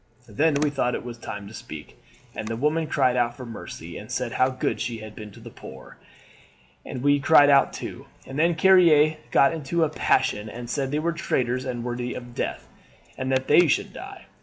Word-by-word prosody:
"Then 145 +8 +1
we 145 0 +1
thought 125 -3 0
it - - -6
was 120 -1 -8
time 105 -3 -7
to 105 - -12
speak, - - -10 0.4
and 110 - -5
the 115 - -3
women 150 +6 0
cried 125 -4 +2
out 120 -1 0
for 125 - -8
mercy, 115 -2 -8
and - - -11
said - - -2
how 130 0 +2
good 130 - -2
she 120 -2 -3
had 110 -1 -10
been 105 -1 -9
to 100 - -15
the - - -11
poor; 65 - -12 0.9
and 130 -2 -7
we 145 0 +4
men - - -6
cried 145 -1 +6
out 140 0 +5
too. - - -8 0.2
And 135 +2 -6
then 170 +1 +3
Carrier 160 -4 +5
got 140 +4 +4
into 165 +2 -1
a 160 - +1
passion, 105 -7 0
and 120 +1 -7
said 135 -2 -1
they 145 - -1
were 165 +2 0
traitors 130 -6 -1
and 120 -2 -4
worthy 120 0 -4
of 120 -1 -9
death, - - -4 0.5
and 130 0 -3
that 130 0 +1
they 175 - +6
should - - 0
die. - - -10
130 Hz, 215 wpm, -24 LUFS, 120-150 Hz, 0.9 s, cried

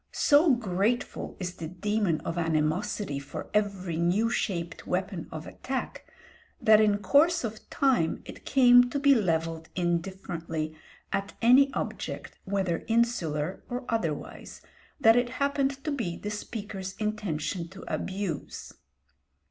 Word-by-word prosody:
So 290 -1 +5
grateful 215 +1 -1
is 180 -1 -4
the 165 - -5
demon 185 -1 0
of 165 - -4
animosity 160 0 0
for 140 0 -8
every 195 -5 0
new 185 +7 +2
shaped 170 -7 -3
weapon 185 -1 -2
of 160 +1 -6
attack, 265 0 -5 0.5
that 215 0 +6
in 210 -1 +3
course 290 - +3
of 220 -2 -6
time 250 -13 +1
it - - -10
came 245 -2 +6
to 280 - -2
be 280 0 +5
levelled 165 -7 0
indifferently 170 -3 -2 0.4
at 195 0 -2
any 260 +4 +6
object - - -5
whether 190 -4 -1
insular 185 -9 0
or 245 +1 -4
otherwise 170 -10 -3 0.4
that 225 -4 +6
it 245 0 +2
happened 280 -1 0
to 305 - -2
be 210 -12 -2
the 210 - -5
speaker's 205 -3 -6
intention 190 -5 -2
to 190 +3 -12
abuse. 190 -6 -4
200 Hz, 130 wpm, -28 LUFS, 170-235 Hz, 0.5 s, that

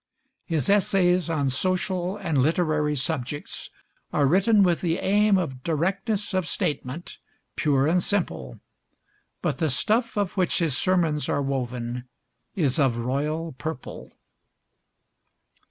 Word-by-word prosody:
His 160 -6 0
essays 185 -3 +3
on 145 -5 0
social 185 +5 0
and 165 -8 -1
literary 155 0 +1
subjects 145 0 -3 0.4
are 145 - +2
written 195 +7 +4
with 175 -3 +2
the 170 -1 0
aim 205 +1 +3
of 135 -8 -3
directness 190 - -1
of 185 -3 0
statement, 145 +2 -3 0.4
pure 140 -3 +2
and 175 +4 +3
simple; 115 - -2 0.8
but - - -1
the 160 - +1
stuff 220 - +1
of 200 -3 0
which 185 -3 +1
his 160 -6 +1
sermons 165 -6 +1
are 145 - 0
woven 125 -2 -3 0.5
is 150 -5 +2
of 130 -5 +2
royal 150 +7 -2
purple. 155 -5 -6
160 Hz, 120 wpm, -25 LUFS, 140-185 Hz, 0.8 s, written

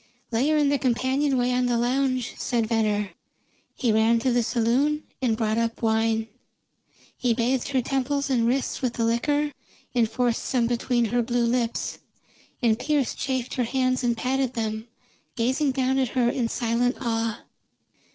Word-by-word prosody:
"Lay 240 +5 +1
her 310 - +3
in 295 -2 +3
the 285 -1 +1
companionway 260 0 +1
on 250 0 +1
the 240 -1 +1
lounge," 255 0 0
said 235 -2 0
Venner. 210 -3 0 0.6
He 240 -4 +1
ran 220 +2 +4
to 255 - +1
the 245 0 +3
saloon 250 +7 +1 0.2
and 230 -4 +1
brought 220 0 0
up 230 0 -2
wine. 225 0 +1 0.9
He 240 -2 +1
bathed 245 +2 0
her 260 -3 0
temples 280 +2 -1
and 240 -4 +2
wrists 260 +2 -1
with 250 -3 0
the 230 - 0
liquor, 290 +6 +1 0.4
and 235 -3 +2
forced 240 0 0
some 245 -3 +1
between 240 0 +1
her 240 +3 +1
blue 240 0 0
lips. 235 -1 -1 0.6
And 225 -2 +3
Pearse 295 -4 0
chafed 260 -2 -3
her 255 - 0
hands 255 +1 0
and 235 -1 +1
patted 260 0 0
them, 220 0 -3 0.5
gazing 260 +4 +1
down 260 0 +1
at 260 -3 +1
her 240 -1 +4
in 245 -3 -1
silent 240 +1 0
awe. 225 -2 -2
245 Hz, 165 wpm, -25 LUFS, 230-260 Hz, 0.9 s, ran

